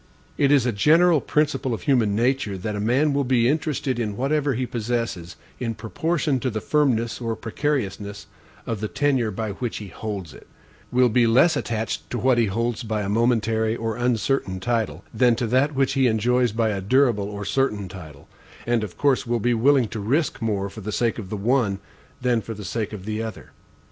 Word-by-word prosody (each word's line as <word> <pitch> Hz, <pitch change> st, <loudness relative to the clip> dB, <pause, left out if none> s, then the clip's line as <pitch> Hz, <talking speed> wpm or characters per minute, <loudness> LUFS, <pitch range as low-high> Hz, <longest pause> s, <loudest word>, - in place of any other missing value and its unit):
It 140 Hz, -1 st, +2 dB
is 140 Hz, -4 st, +4 dB
a 125 Hz, -, +2 dB
general 155 Hz, -, +4 dB
principle 135 Hz, -5 st, 0 dB
of 95 Hz, -, -10 dB
human 115 Hz, -7 st, +2 dB
nature, 120 Hz, -3 st, 0 dB
that 105 Hz, +3 st, -4 dB
a -, -, -3 dB
man 130 Hz, +8 st, +2 dB
will 140 Hz, 0 st, +1 dB
be 125 Hz, -2 st, +2 dB
interested 145 Hz, -3 st, -1 dB
in 105 Hz, -3 st, -2 dB
whatever 140 Hz, 0 st, 0 dB
he 130 Hz, +2 st, -1 dB
possesses, 115 Hz, -7 st, -3 dB, 0.2 s
in 115 Hz, -3 st, -2 dB
proportion 145 Hz, -, -1 dB
to 130 Hz, -, -1 dB
the 110 Hz, -2 st, -3 dB
firmness 120 Hz, -3 st, +1 dB
or 115 Hz, -1 st, -2 dB
precariousness 105 Hz, -4 st, -3 dB, 0.4 s
of 115 Hz, -3 st, -3 dB
the 110 Hz, -, -2 dB
tenure 135 Hz, -3 st, +1 dB
by 110 Hz, +1 st, -3 dB
which 120 Hz, +4 st, -4 dB
he 105 Hz, -2 st, -7 dB
holds 95 Hz, -5 st, -6 dB
it; -, -, -15 dB, 0.4 s
will 125 Hz, 0 st, +4 dB
be 120 Hz, 0 st, +3 dB
less 135 Hz, +8 st, +5 dB
attached 115 Hz, -5 st, -3 dB
to 120 Hz, -, -3 dB
what 125 Hz, +1 st, +3 dB
he 115 Hz, -, +3 dB
holds 115 Hz, +4 st, -1 dB
by 110 Hz, -3 st, -2 dB
a 100 Hz, -, -3 dB
momentary 110 Hz, 0 st, +1 dB
or 115 Hz, -1 st, -3 dB
uncertain 120 Hz, -5 st, 0 dB
title, 115 Hz, +2 st, -1 dB
than 125 Hz, -2 st, +4 dB
to 120 Hz, -, -1 dB, 0.3 s
what 135 Hz, -1 st, +2 dB
he 135 Hz, -1 st, +3 dB
enjoys 120 Hz, +2 st, +2 dB
by 110 Hz, +1 st, +1 dB
a 100 Hz, -2 st, -2 dB
durable 115 Hz, -2 st, +2 dB
or 105 Hz, 0 st, -6 dB
certain 105 Hz, -5 st, 0 dB
title; 80 Hz, -6 st, -11 dB, 0.4 s
and, 120 Hz, -2 st, +1 dB
of 105 Hz, -, -7 dB
course, 140 Hz, -4 st, +2 dB
will 120 Hz, 0 st, 0 dB
be 120 Hz, +3 st, +1 dB
willing 130 Hz, +1 st, +3 dB
to 110 Hz, -, -5 dB
risk 130 Hz, +10 st, 0 dB
more 105 Hz, -3 st, -1 dB
for 110 Hz, +2 st, -10 dB
the 105 Hz, +2 st, -4 dB
sake 115 Hz, +2 st, 0 dB
of 95 Hz, -4 st, -7 dB
the 105 Hz, -, -3 dB
one, 110 Hz, -1 st, +1 dB, 0.4 s
than 125 Hz, -3 st, +1 dB
for 115 Hz, +1 st, -7 dB
the 105 Hz, -1 st, -8 dB
sake 110 Hz, +3 st, -3 dB
of 100 Hz, -3 st, -8 dB
the 110 Hz, +1 st, -2 dB
other. 110 Hz, -1 st, -7 dB
115 Hz, 200 wpm, -23 LUFS, 105-130 Hz, 0.4 s, less